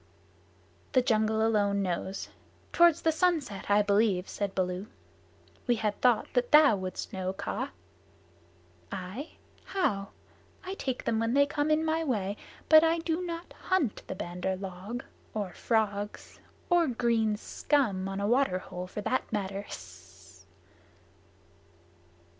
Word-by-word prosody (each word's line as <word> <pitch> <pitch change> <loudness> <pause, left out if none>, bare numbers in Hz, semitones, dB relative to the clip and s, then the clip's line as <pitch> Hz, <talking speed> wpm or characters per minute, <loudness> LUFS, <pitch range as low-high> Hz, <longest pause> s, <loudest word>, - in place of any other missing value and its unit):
"The 255 -2 +4
jungle 220 -2 +2
alone 200 -3 +2
knows. 190 +1 -3 0.4
Toward 340 -2 +6
the 320 - +1
sunset, 315 - 0
I 205 +1 +5
believe," 200 -2 +2
said 200 -1 -3
Baloo. 185 +1 -1 0.8
"We 240 - +4
had 215 -2 -2
thought 245 -4 +3
that 245 -1 +1
thou 300 -6 +7
wouldst 185 -1 -5
know, 190 0 -2
Kaa." - - -3 1.2
"I? 190 - -6 0.3
How? 200 - -1 0.6
I 380 0 -5
take 260 -9 -3
them 225 -1 0
when 230 +2 0
they 285 0 +6
come 290 +1 -1
in 310 +1 +2
my 320 +1 +1
way, 205 -9 -1 0.3
but 315 0 +8
I 330 +1 +3
do 330 +1 -1
not 340 0 -6
hunt 345 - 0
the - - -4
Bandar 180 +1 -3
log, 195 +6 -6 0.3
or 200 -5 -3
frogs 210 -2 -2 0.3
or 345 -2 +5
green 230 -3 +1
scum 210 -7 0
on 195 0 -4
a 200 - -1
water 245 -5 +3
hole, 180 -1 -7
for 210 - -5
that 255 +5 -1
matter." 200 -1 -3
220 Hz, 135 wpm, -29 LUFS, 195-285 Hz, 1.2 s, but